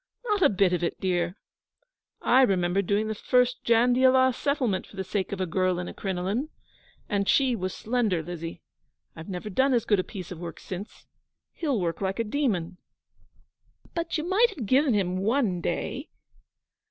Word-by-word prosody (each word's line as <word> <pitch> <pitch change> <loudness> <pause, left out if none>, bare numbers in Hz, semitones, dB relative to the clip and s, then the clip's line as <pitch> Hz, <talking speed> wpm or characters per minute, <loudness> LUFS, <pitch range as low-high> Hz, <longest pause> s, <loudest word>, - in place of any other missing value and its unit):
'Not 420 -4 0
a - - +6
bit 190 -2 +2
of 180 - 0
it, 170 - -2
dear 175 0 -1 0.9
I 255 +2 +5
remember 190 -5 +2
doing 205 +3 0
the 220 - -1
first 250 +3 +1
Jandiala 255 +2 +4
Settlement 255 -8 -1
for - - -15
the 190 - -3
sake 190 0 -2
of 200 - -4
a 185 - 0
girl 185 +1 0
in 175 0 -4
a - - -7
crinoline; 195 +9 -2 0.6
and 200 -1 0
she 265 -3 +3
was 185 -3 -3
slender, 220 -8 0
Lizzie. 165 0 -7 0.5
I've 160 +4 -9
never 190 +3 -5
done 265 +6 +3
as 235 - +1
good 205 -3 +3
a - - +1
piece 185 -4 -8
of 175 - -7
work 170 -1 -7
since. 190 +3 -8 0.5
He'll 285 -9 -1
work 170 -1 -2
like 190 0 -1
a 230 - +1
demon.' 210 - -1 1.2
'But 335 -1 -2
you 310 - -2
might 430 +6 +4
have 245 - -5
given 260 +2 +3
him 185 -2 0
one 205 -3 +1
day.' - - -3
200 Hz, 175 wpm, -27 LUFS, 180-250 Hz, 1.2 s, a